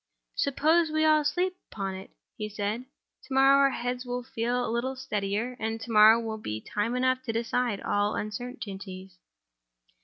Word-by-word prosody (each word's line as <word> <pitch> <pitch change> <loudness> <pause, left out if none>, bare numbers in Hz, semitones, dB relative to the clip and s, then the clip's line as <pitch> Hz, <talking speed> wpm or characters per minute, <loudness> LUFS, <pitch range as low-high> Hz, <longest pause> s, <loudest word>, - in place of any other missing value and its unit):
"Suppose 315 +4 +2
we 310 0 +1
all 310 -1 +5
sleep 360 +5 0 0.2
upon 195 -2 -3
it?" 190 +1 -9 0.3
he 215 0 -4
said. 210 +4 -3 0.4
"Tomorrow 270 0 +4
our 275 0 +5
heads 245 -1 -3
will 245 0 -4
feel 245 0 -1
a - - -2
little 255 +3 -1
steadier; 210 0 -2
and 225 +1 -2
to 225 +1 -7
morrow 220 +1 +8
will 220 -1 -4
be 110 - -4
time 210 - -2
enough 255 0 +1
to 255 -3 -3
decide 235 -1 -1
all 205 +1 0
uncertainties." 195 -5 -6
235 Hz, 160 wpm, -28 LUFS, 210-260 Hz, 0.4 s, morrow